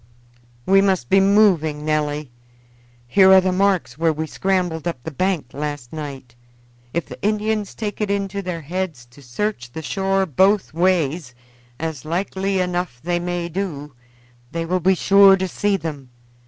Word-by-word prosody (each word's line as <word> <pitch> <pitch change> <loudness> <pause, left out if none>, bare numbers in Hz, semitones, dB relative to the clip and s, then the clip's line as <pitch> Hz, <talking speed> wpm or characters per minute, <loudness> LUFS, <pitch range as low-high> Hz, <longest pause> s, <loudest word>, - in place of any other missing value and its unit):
"We 195 +1 +5
must 190 -11 0
be 195 - +6
moving, 190 -7 +3
Nelly. 150 -2 -1 0.8
Here 190 +9 +6
are 190 - +9
the 185 0 0
marks 180 -9 0
where 165 -1 +3
we 155 +1 -3
scrambled 180 -2 -1
up 170 - -2
the 160 - -5
bank 160 -4 -2
last 145 -3 -5
night. 140 -5 -7 0.6
If 170 - -2
the - - -11
Indians 210 -1 -1
take 215 -1 -5
it 210 - 0
into 200 0 -2
their 180 -3 -5
heads 165 -5 -4
to 140 - -16
search 125 - -4
the 160 - -6
shore 195 +3 0
both 190 +6 +2
ways, 165 -6 0 0.4
as 160 -5 -4
likely 190 +3 -1
enough 180 -7 -2
they 175 +1 0
may 175 0 -3
do, 160 -6 -5 0.6
they 165 0 -3
will 185 +2 0
be 190 +2 +3
sure 195 +1 +6
to 190 0 -2
see 200 +2 0
them. 145 -7 -7
175 Hz, 160 wpm, -21 LUFS, 150-195 Hz, 0.8 s, are